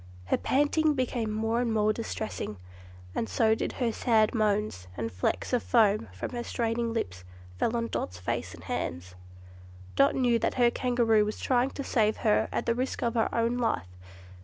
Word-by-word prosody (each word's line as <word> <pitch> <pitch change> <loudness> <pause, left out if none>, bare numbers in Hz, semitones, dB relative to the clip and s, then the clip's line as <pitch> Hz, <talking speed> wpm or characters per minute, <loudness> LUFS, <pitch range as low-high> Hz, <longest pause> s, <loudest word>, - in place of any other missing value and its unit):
Her - - +1
panting 290 +2 +2
became 245 -4 -1
more 225 +2 0
and 240 -2 0
more 215 -1 +2
distressing, 220 - -4 0.6
and 225 - -2
so 220 -2 +3
did - - -2
her 240 -3 0
sad 220 -2 +2
moans 210 - 0
and 115 0 -3
flecks 95 - -2
of 245 - +3
foam 215 - +3
from 95 - -6
her 240 -1 -4
straining 230 0 -1
lips 90 - -3 0.4
fell 235 - +1
on 230 - -1
Dot's 90 - -4
face 90 - -3
and - - -14
hands. 90 +1 -4 0.8
Dot 275 - +4
knew 245 -3 +3
that - - -1
her 240 -2 +4
Kangaroo 235 -4 +2
was 210 +1 -3
trying 255 0 +2
to 275 - -6
save 220 -4 +1
her 210 - +3
at - - -2
the 235 - +2
risk 255 +3 -2
of 235 -1 +1
her 225 -2 +1
own 235 +1 0
life. 90 - -1
230 Hz, 185 wpm, -28 LUFS, 210-245 Hz, 0.8 s, Dot